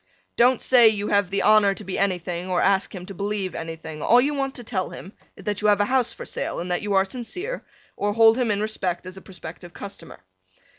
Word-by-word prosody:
Don't 245 +1 +4
say 245 -3 +7
you 210 -1 +1
have 200 -2 +2
the 195 +1 -1
honor 210 -2 +5
to 210 - -9
be 190 -1 -4
anything 180 -2 -1
or 180 -1 +1
ask 195 +1 +1
him 180 -1 -7
to 195 - -8
believe 200 -1 -3
anything, 160 -1 -7
all 240 +9 +5
you 285 +4 +1
want 270 -1 -2
to 245 - -7
tell 200 -5 -2
him 190 - -10 0.2
is - - -13
that 205 -1 -2
you 210 - +2
have 205 -1 +4
a 205 - +3
house 255 +1 +1
for - - -8
sale - - -4
and 180 +1 -4
that 175 - 0
you 205 0 -2
are 190 0 +4
sincere, 310 - -5 0.3
or 205 0 -1
hold 225 0 +6
him 250 -2 0
in 205 0 +1
respect 190 -5 -2
as 185 0 -8
a 190 - -10
prospective 175 -1 -10
customer. 200 -4 -9
200 Hz, 240 wpm, -24 LUFS, 185-225 Hz, 0.3 s, say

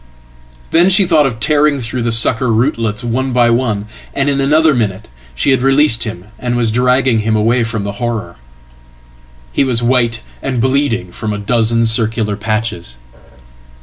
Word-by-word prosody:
Then 170 +3 +4
she 190 +1 +4
thought 155 -5 +3
of 115 -4 -6
tearing 150 -1 +2
through 125 +1 -3
the 115 0 -1
sucker 115 +2 +3
rootlets 115 -2 -1
one 130 +3 -2
by 120 -1 +3
one, 115 -4 -1 0.3
and 140 +1 0
inanother 145 +3 +2
minute 105 -4 -2 0.3
she 100 - +1
had 130 - +2
released 135 -3 +3
him 90 -5 -7
and 120 -1 -2
was 115 -2 0
dragging 125 0 +2
him 110 +1 0
away 115 +3 +1
from 115 -2 -3
thehorror. 105 -3 -4 1.1
He - - +1
was 120 -3 0
white 120 -2 +1 0.2
and 130 -3 -3
bleeding 130 -6 0
from 105 +3 -4
a - - -3
dozen 115 +2 +1
circular 110 -2 0
patches. 105 - -4
120 Hz, 155 wpm, -14 LUFS, 110-130 Hz, 1.1 s, Then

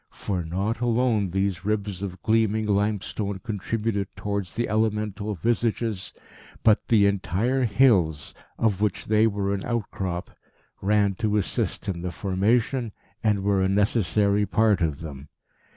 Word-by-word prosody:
For 95 -4 -3
not 95 +8 -2
alone 120 -4 +1
these 95 -1 -1
ribs 100 -2 -2
of 95 -2 -6
gleaming 110 -1 +2
limestone 100 0 -1
contributed 105 0 -2
towards 100 -2 -3
the 120 - 0
elemental 105 -1 -1
visages, 115 0 -1 0.5
but 110 -2 +4
the 105 -3 +5
entire 100 +6 +1
hills, 100 - +3 0.2
of 105 -4 +1
which 105 -3 0
they 110 +1 +4
were 100 -2 -1
an 100 - -3
outcrop, 95 -6 -3 0.5
ran 100 0 +2
to 105 -2 +1
assist 100 - -1
in 90 -3 -2
the 90 0 -3
formation, 105 - 0 0.3
and 105 -3 +2
were 100 -1 +2
a 95 - +2
necessary 100 0 +2
part 110 -4 +3
of 80 -3 -1
them. 70 -3 -8
100 Hz, 135 wpm, -25 LUFS, 95-110 Hz, 0.5 s, the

